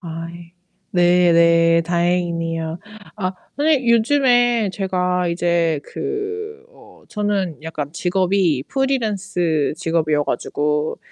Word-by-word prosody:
아 165 -1 -6
예. 170 0 -13 0.4
네 175 -1 +4
네. 165 0 +4
다행이네요. 170 -1 -1 0.4
아 185 -3 -2 0.2
선생님 290 -4 +2
요즘에 245 -3 +3
제가 180 -2 -1
이제 170 -2 0
그 425 +1 -5
어 - - -18
저는 205 -7 -2
약간 155 -3 -5
직업이 180 -4 +1
프리랜스 205 - -1
직업이어 155 -3 0
가지고 150 +1 -2
175 Hz, 215 characters per minute, -20 LUFS, 165-215 Hz, 0.4 s, 네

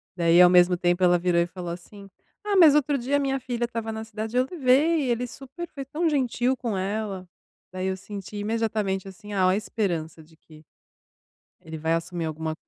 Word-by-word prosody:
Daí, 170 0 +5
ao 180 - +8
mesmo 180 0 +5
tempo, 175 +1 +1
ela 175 0 +5
virou 175 -1 +2
e 170 - 0
falou 175 -1 -7
assim: 195 +3 -11 0.4
"Ah, 410 -1 0
mas 315 -5 +8
outro 290 -1 +2
dia 270 +4 0
a - - 0
minha 270 -1 -1
filha 240 -1 -2
estava 225 -1 -4
na 220 0 -5
cidade, 220 +2 -5
eu 255 - +3
levei, 290 -1 +2
ele 240 +1 0
super 275 +8 -9
foi 275 -2 -5
tão 315 +5 -2
gentil 260 -2 0
com 230 -6 -3
ela". 195 -1 -3 0.5
Daí 185 0 -3
eu 190 0 -2
senti 200 +1 -8
imediatamente, 210 -3 -1
assim, 205 +2 -9
oh, 185 -1 +3
esperança 180 -6 -2
de 160 +1 -22
que 155 -1 -18 1.0
ele 160 0 -8
vai 160 +1 0
assumir 165 0 -3
alguma 160 0 -4
205 Hz, 195 wpm, -25 LUFS, 175-250 Hz, 1.0 s, ao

